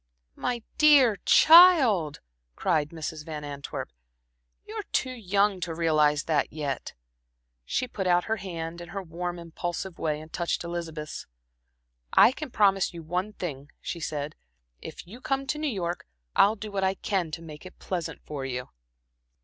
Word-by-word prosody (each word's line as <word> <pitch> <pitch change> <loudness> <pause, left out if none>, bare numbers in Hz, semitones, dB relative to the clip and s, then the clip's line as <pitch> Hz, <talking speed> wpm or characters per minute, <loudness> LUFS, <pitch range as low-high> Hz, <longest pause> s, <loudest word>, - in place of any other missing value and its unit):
"My 245 -2 -2 0.2
dear 280 -8 +6
child," 285 - +7 0.3
cried 150 -2 +1
Mrs. 160 -1 -6
Van 150 -1 -6
Antwerp, 140 -1 -6 0.7
"you're - - -5
too 260 - 0
young 200 -4 +1
to 170 -2 -4
realize 155 -2 +3
that 150 -3 0
yet." 145 -4 -4 0.7
She 255 - -1
put 195 -5 -3
out 175 0 +4
her 220 0 -1
hand 170 -3 -6
in 175 - -9
her 195 -1 -5
warm, 175 +1 -4
impulsive 175 +2 -5
way, 150 -2 -1
and 155 +1 -13
touched 175 0 -1
Elizabeth's. 165 -3 -5 0.9
"I - - +7
can 300 +2 -6
promise 195 -5 +2
you 165 - -7
one 180 +6 -2
thing," 145 -7 -6
she 170 - -5
said. 150 -2 -4 0.5
"If - - -9
you 225 +8 -12
come 270 0 -1
to 300 +2 -2
New 305 - -1
York, 175 -6 -3 0.3
I'll 210 +2 +5
do 215 0 -7
what 195 -1 -1
I 190 0 +2
can 190 -4 -1
to 165 - -13
make 150 -2 -10
it 185 - -12
pleasant 175 -3 -5
for 145 -3 -5
you." 125 -1 -4
175 Hz, 160 wpm, -27 LUFS, 155-205 Hz, 0.9 s, child